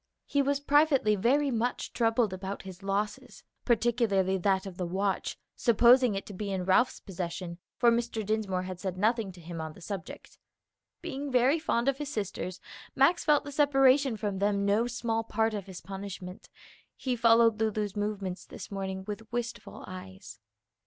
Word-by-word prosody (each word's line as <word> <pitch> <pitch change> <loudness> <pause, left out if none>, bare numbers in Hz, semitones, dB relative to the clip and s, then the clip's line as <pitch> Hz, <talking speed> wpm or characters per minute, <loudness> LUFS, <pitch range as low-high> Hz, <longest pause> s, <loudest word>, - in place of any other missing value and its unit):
He 285 - +1
was 280 0 +1
privately 285 -6 +3
very 270 +8 +2
much 240 +1 -2
troubled 225 -3 +2
about 190 +1 -5
his 190 -1 -10
losses, 200 +2 -3 0.2
particularly 225 -5 +2
that 190 +1 +1
of 190 -2 -8
the 180 - -2
watch, 195 +2 -1 0.2
supposing 240 0 +5
it 195 - -4
to 205 - -9
be 200 +1 -4
in 185 -2 -2
Ralph's 240 +7 +3
possession, 175 -2 -5 0.2
for 235 - +5
Mr. 230 -2 -1
Dinsmore 200 -3 -1
had 185 -1 -6
said 185 -1 -4
nothing 220 0 +1
to 175 - -14
him 170 -1 -7
on 160 -1 -6
the - - -15
subject. 190 -2 -8 0.6
Being 280 +1 -4
very 255 +5 +4
fond 240 -5 0
of 275 0 +1
his 295 -2 -4
sisters, 195 -4 -4 0.4
Max 285 +7 +4
felt 300 -2 +4
the 290 - -7
separation 270 -3 +4
from 200 -2 -3
them 200 0 +1
no 210 +4 +2
small 230 -1 -1
part 225 0 0
of 200 -3 -5
his 185 -2 -9
punishment; 195 -1 -8 0.5
he 255 -2 -2
followed 230 -1 +5
Lulu's 215 -2 -1
movements 205 -3 -3
this - - -10
morning 190 -1 -4
with 215 +2 -7
wistful 240 -1 -5
eyes. 95 - -10
210 Hz, 170 wpm, -29 LUFS, 190-240 Hz, 0.6 s, supposing